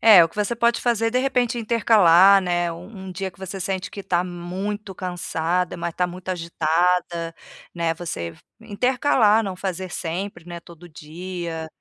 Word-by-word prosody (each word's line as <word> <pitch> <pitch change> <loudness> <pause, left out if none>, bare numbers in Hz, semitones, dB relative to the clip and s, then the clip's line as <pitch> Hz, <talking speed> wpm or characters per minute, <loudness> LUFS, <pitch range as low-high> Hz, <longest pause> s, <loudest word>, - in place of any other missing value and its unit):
É, 215 -6 +9
o 165 - +2
que - - -21
você 210 +3 0
pode 235 0 +2
fazer 230 -2 +1
de 250 - +1
repente, 250 -2 +1
intercalar, 200 -5 +6
né? 175 -1 0
Um 165 +1 -9 0.2
um - - -6
dia 190 +1 -4
que 185 - -26
você 190 +1 -6
sente 190 +1 -3
que 200 - -7
tá 175 -2 +1
muito 190 +3 -5
cansada, 175 -1 -2
mas 170 -1 -4
tá 180 - +1
muito 180 +1 -10
agitada, 170 0 0 0.4
né, 170 -1 0
você 125 - -5 0.3
intercalar, 225 0 +2
não 190 -3 -4
fazer 185 -1 -4
sempre, 175 +1 -4
né, 175 -1 -7
todo 170 +1 -14
dia. 165 +1 -6
180 Hz, 170 wpm, -23 LUFS, 170-205 Hz, 0.4 s, É